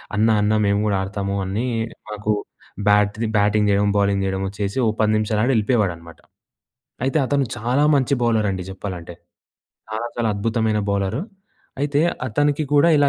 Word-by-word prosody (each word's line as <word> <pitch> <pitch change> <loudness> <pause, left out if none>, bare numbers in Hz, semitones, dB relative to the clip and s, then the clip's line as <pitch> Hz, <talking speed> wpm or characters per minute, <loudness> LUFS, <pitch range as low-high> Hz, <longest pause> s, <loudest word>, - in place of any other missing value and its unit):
"అన్నా 110 +1 +3
అన్న 105 +1 +2
మేము 100 0 +2
గూడా 100 -2 +1
ఆడతాము" 100 0 -3
అని 100 +6 -2 0.4
మాకు 105 0 -2 0.6
బ్యాట్ 105 0 +3 0.2
బ్యాటింగ్ 105 0 +3
జెయడం, 100 0 +3
బౌలింగ్ 100 -1 +2
జెయడమొ 95 0 -2
చేసి 100 +3 -2
ఓ - - +3
10 110 0 +3
నిమిషాలాడి 110 +3 +1
ఎళ్ళిపోయేవాడనమాట. 100 -7 -1 0.9
అయితే 135 +4 +1
అతను 140 +1 +1
చాలా 125 +5 +1
మంచి 140 -1 +2
బౌలర్ 110 -3 +2
అండి 95 -1 -3
జెప్పాలంటే. 95 -3 -7 0.8
చాలా 110 +2 -3
చాలా 120 -2 0
అద్భుతమైన 110 +1 0
బౌలర్. 100 +5 -1 0.6
అయితే 145 0 +1 0.3
అతనికి 145 +5 +1
కూడా 145 +3 +5
ఇలా 145 -1 +4
105 Hz, 145 wpm, -21 LUFS, 100-120 Hz, 0.9 s, కూడా